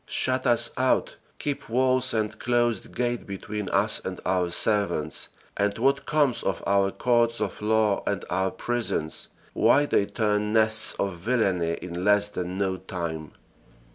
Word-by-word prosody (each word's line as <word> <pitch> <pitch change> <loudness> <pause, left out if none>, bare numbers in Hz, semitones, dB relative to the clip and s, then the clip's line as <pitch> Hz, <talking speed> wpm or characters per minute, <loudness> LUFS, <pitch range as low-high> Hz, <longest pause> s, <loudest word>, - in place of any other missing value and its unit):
Shut 130 +1 0
us 120 -1 +5
out 130 0 +1 0.2
keep 145 -5 -4
walls 130 +1 +2
and 110 -1 -2
closed 120 -3 -1
gate 120 0 -2
between 100 +1 -5
us - - +2
and - - -5
our 90 -1 +1
servants 90 -6 +1 0.3
and 100 0 0
what 135 +3 +1
comes 145 -5 +1
of 95 -3 -3
our 100 0 +2
courts 120 +1 +1
of - - -4
law 110 -1 +2
and 100 -1 -2
our 95 +1 0
prisons? 120 -11 -2 0.3
Why 145 +1 +4
they 100 -7 +1
turn 105 -1 -1
nests 110 -1 +4
of 100 -3 -2
villainy 95 -6 0
in 90 0 -5
less 105 +1 +3
than 90 -1 -5
no 95 -1 -1
time." 85 -5 -6
105 Hz, 150 wpm, -25 LUFS, 95-120 Hz, 0.3 s, us